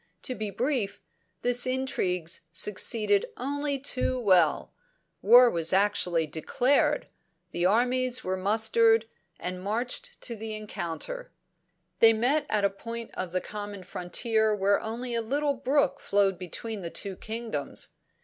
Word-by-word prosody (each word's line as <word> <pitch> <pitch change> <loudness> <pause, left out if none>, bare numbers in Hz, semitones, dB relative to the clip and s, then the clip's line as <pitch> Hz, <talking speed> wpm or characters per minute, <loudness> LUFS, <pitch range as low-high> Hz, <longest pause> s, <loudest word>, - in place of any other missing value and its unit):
To 255 - -2
be 215 -4 -3
brief, 240 -2 -1 0.4
these 245 +1 +2
intrigues 185 -10 -1
succeeded 205 +3 0
only 285 +2 -1
too 255 -1 0
well; 185 -8 +3 0.5
war 245 +4 +8
was 170 -6 0
actually 185 -4 +2
declared, 270 - +1 0.5
the 175 +1 +1
armies 250 +4 +2
were 185 0 -1
mustered, 225 +3 +3 0.3
and 180 0 -4
marched 245 - -1
to 235 - -3
the 220 0 -5
encounter. 215 - -5 0.7
"'They 225 0 +7
met 270 +7 +1
at 210 -2 +2
a - - +4
point 230 +3 -7
of 185 -2 -4
the 185 0 -1
common 205 -2 -7
frontier 220 +5 0
where 200 0 +2
only 235 +3 -5
a 230 - +1
little 285 +5 0
brook 275 +2 +1
flowed 195 -2 +1
between 205 +4 -5
the 170 - -4
two 195 +2 -4
kingdoms. 220 -10 -4
220 Hz, 135 wpm, -27 LUFS, 195-250 Hz, 0.7 s, war